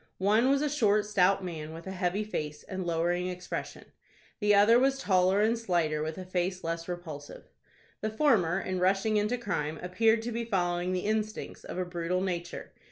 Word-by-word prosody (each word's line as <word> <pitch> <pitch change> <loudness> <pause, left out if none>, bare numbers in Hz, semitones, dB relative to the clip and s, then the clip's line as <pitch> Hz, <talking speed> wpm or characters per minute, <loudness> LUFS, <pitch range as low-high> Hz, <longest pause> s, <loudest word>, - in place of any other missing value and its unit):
One 215 +6 +3
was 280 +1 +3
a - - +2
short, 215 -7 +2
stout 195 -1 +3
man, 160 -3 -6
with 165 +1 -9
a 190 - -5
heavy 190 +2 -1
face 150 -8 -5
and 185 -2 -5
lowering 175 +2 0
expression; 180 0 -6 0.5
the 210 -2 +4
other 215 +4 +6
was 270 +1 +2
taller 190 -4 +3
and 225 +2 +3
slighter, 170 -9 0
with 155 +1 -3
a 185 - -6
face 185 0 -2
less 165 0 -3
repulsive. 160 -5 -7 0.6
The 215 - -1
former, 215 - +2
in 185 -1 -3
rushing 195 +4 +2
into 210 +4 +1
crime, 160 -9 -2
appeared 220 +5 +2
to 240 - -3
be 235 +1 -2
following 180 -4 0
the 185 0 -2
instincts 215 0 -2
of - - -7
a 185 - -1
brutal 175 +1 -2
nature. 175 -2 -4
185 Hz, 185 wpm, -29 LUFS, 175-215 Hz, 0.6 s, other